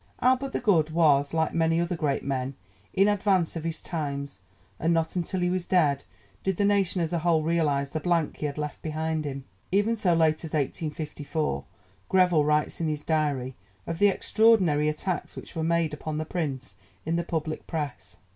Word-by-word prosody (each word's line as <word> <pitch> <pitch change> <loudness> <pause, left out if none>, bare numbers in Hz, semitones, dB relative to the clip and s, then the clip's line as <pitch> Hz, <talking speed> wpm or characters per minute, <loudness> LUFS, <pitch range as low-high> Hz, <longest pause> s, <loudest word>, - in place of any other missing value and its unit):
'Albert 260 +2 +2
the - - -1
Good' 175 -10 +3
was, 150 -4 +3
like 160 -1 0
many 165 0 +2
other 170 +1 0
great 145 -4 -1
men, 135 -1 -2 0.4
in 195 +1 +4
advance 195 -5 +2
of 165 - -4
his 165 -1 -3
times, 140 - -4 0.4
and 165 - +1
not 165 +1 0
until 180 +1 -1
he 180 - +2
was 185 -1 -2
dead 145 -7 +2 0.4
did 190 -2 -1
the 205 - +2
nation 195 -3 +2
as 165 +1 -3
a 170 - +1
whole 160 -1 +2
realize 150 -4 +1
the 155 - -2
blank 165 -1 0
he 150 - -2
had 145 - -6
left 150 -1 -4
behind 160 0 -2
him. 135 -2 -5 0.3
Even 205 +4 +2
so 185 -6 +2
late 160 -1 +2
as 160 - -7
1854 150 +1 -2 0.4
Greville 180 -5 +4
writes 150 +2 +1
in 165 - 0
his 150 -1 -2
Diary 145 -5 0 0.3
of 165 0 -4
the 205 - +6
extraordinary 190 -7 +3
attacks 170 +4 -3
which - - -9
were 160 - -1
made 165 -1 +1
upon 150 0 -4
the 155 - -2
Prince 145 -7 -3 0.3
in 165 +2 0
the 170 - 0
public 160 -2 -3
Press. 150 -4 -5
160 Hz, 190 wpm, -27 LUFS, 150-175 Hz, 0.4 s, the